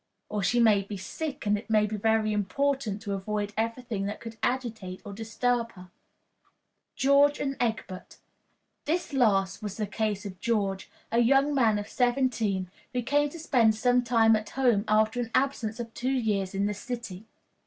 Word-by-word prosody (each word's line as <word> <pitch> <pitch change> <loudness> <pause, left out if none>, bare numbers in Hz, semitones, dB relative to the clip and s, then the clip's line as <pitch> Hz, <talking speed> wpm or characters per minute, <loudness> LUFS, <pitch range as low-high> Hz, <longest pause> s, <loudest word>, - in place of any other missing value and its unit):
Or 210 -1 -2
she 230 +6 +2
may 215 -4 +5
be 200 +1 -7
sick, 290 - -5
and 205 0 +3
it 225 - -15
may 215 -1 +4
be 215 +1 -3
very 220 0 +1
important 215 +1 -1
to 205 -2 -3
avoid 205 +1 -3
every 230 +3 -2
thing 210 -5 -3
that 205 - -5
could 230 -1 -8
agitate 225 -7 -2
or 205 - -7
disturb 230 +2 -1
her. 180 -1 -14 1.0
George 280 +2 +4
and 275 -1 -2
Egbert. 210 -5 -3 0.7
This 330 0 -1
last 200 -7 +2
was 205 -2 -5
the 215 - -1
case 210 0 -2
of 190 -2 -7
George, 200 -4 -1 0.2
a 230 - +2
young 270 +4 +4
man 230 -6 +3
of 205 - -4
seventeen, 240 -7 0 0.2
who 250 -1 -1
came 290 +4 +2
to 335 - -10
spend 245 -9 +3
some 245 +2 +2
time 225 -2 +4
at 215 0 -3
home 240 -6 +2
after 215 +2 +2
an 235 -2 -2
absence 240 -5 0
of 230 -1 -6
two 255 - -2
years 210 -7 0
in 200 +1 +1
the 210 - 0
city. 220 -2 -7
220 Hz, 180 wpm, -28 LUFS, 205-245 Hz, 1.0 s, may